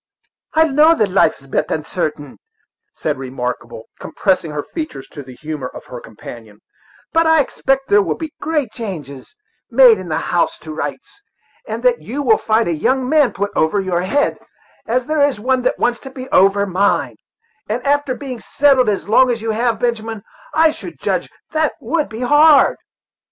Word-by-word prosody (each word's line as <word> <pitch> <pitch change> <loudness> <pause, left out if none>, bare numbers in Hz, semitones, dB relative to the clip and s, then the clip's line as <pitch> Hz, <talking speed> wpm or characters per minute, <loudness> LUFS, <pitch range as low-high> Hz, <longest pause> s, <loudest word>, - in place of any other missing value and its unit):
"I 320 - +6
know 310 +3 +5
that 210 - 0
life 195 - +3
is 135 - -19
disp'ut - - -1
unsartain," 155 -2 -3 0.6
said 150 -4 -3
Remarkable, 125 -3 -5 0.2
compressing 185 -5 -1
her 150 -1 -4
features 310 - -6
to 145 - -9
the 130 -2 -12
humor 150 -2 -5
of - - -11
her 125 - -8
companion; 110 -1 -12 0.5
"but 330 0 +3
I 320 0 +5
expect 270 -1 0
there 205 0 +5
will - - -2
be 320 -3 -6
great 295 -7 -1
changes 160 - -8 0.3
made - - +6
in - - -8
the - - 0
house - - 0
to - - -8
rights; - - -6 0.5
and - - -5
that - - +2
you 285 +5 -4
will 225 -5 +4
find 220 -1 +1
a 170 - 0
young 255 - 0
man 295 -2 +3
put 200 +1 -3
over 160 +6 +2
your 185 -3 -1
head, 280 +11 0 0.5
as 250 +2 0
there 310 +1 0
is 285 -6 +2
one 255 +3 +1
that 250 - 0
wants 240 0 0
to 270 - -10
be 260 -1 -8
over 195 +1 +4
mine; 200 +1 0 0.5
and 240 +3 -3
after 285 -1 +1
having 260 -2 -6
been - - -14
settled 270 -4 +3
as 200 - -2
long 255 +4 +5
as 235 -1 0
you 225 - -1
have, 230 0 0
Benjamin, 225 -3 -2 0.3
I 320 0 +4
should - - -10
judge - - -1 0.2
that 315 -1 +1
to 295 +4 -1
be 220 +2 -7
hard." 295 +2 +5
230 Hz, 185 wpm, -18 LUFS, 180-285 Hz, 0.6 s, I